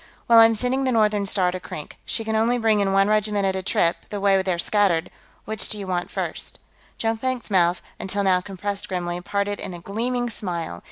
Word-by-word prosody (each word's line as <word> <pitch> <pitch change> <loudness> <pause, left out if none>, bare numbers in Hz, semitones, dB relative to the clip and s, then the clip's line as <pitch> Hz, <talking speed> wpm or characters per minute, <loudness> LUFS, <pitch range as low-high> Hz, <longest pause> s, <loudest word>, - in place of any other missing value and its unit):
"Well, 230 -1 +7
I'm 225 0 +7
sending 250 +4 0
the 260 - +1
Northern 210 -3 +2
Star 185 -3 +2
to 185 - -5
Krink. 155 -4 -8
She 225 - -1
can 220 0 -2
only 230 +3 +2
bring 220 -3 +2
in 200 -1 +1
one 195 +1 +4
regiment 210 -1 +1
at 190 -1 +1
a 190 - -2
trip, 170 -2 +1
the 205 - -4
way 195 -1 +3
they're 185 -2 -1
scattered; 175 -2 +2 0.3
which 220 -2 -4
one - - +4
do 215 - -1
you 200 - -5
want 180 -1 -2
first?" - - -3 0.4
Jonkvank's 230 +1 -2
mouth, 175 -2 +2 0.2
until 200 +1 -2
now 185 -2 +3
compressed 200 +1 -4
grimly, 175 -1 -3
parted 200 +2 -2
in 180 - -5
a - - -8
gleaming 240 +7 -2
smile. 170 - -4
200 Hz, 215 wpm, -23 LUFS, 185-220 Hz, 0.4 s, Well